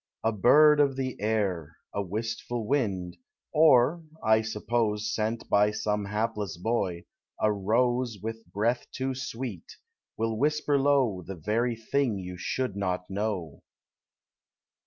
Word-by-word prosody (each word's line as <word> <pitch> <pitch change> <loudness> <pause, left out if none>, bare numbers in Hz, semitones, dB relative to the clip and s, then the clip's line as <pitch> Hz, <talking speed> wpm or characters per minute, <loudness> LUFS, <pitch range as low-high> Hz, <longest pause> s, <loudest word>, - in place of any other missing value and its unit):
A 115 - +2
bird 150 +8 +6
of 140 -2 +3
the 130 -1 -3
air, 95 -8 -1 0.2
A 100 - -1
wistful 110 +4 -3
wind, 100 -9 -1 0.4
or 155 +1 +5
( - - -22
I 110 0 +4
suppose 110 -1 -1
Sent 110 +1 -2
by 105 +1 +4
some 105 -1 -1
hapless 105 -2 -2
boy) 90 -3 -1 0.4
a 105 0 +3
rose 120 +3 +1
With 115 +2 -7
breath 115 +4 0
too 130 0 -2
sweet, 125 -7 -6 0.4
will 110 -1 -1
whisper 150 0 +2
low 135 -9 +2
The 95 +3 -7
very 115 +8 0
thing 115 0 0
you 90 -1 -6
should 105 +4 -2
not 90 -2 -2
know! 95 -7 -3
110 Hz, 135 wpm, -28 LUFS, 100-125 Hz, 0.4 s, bird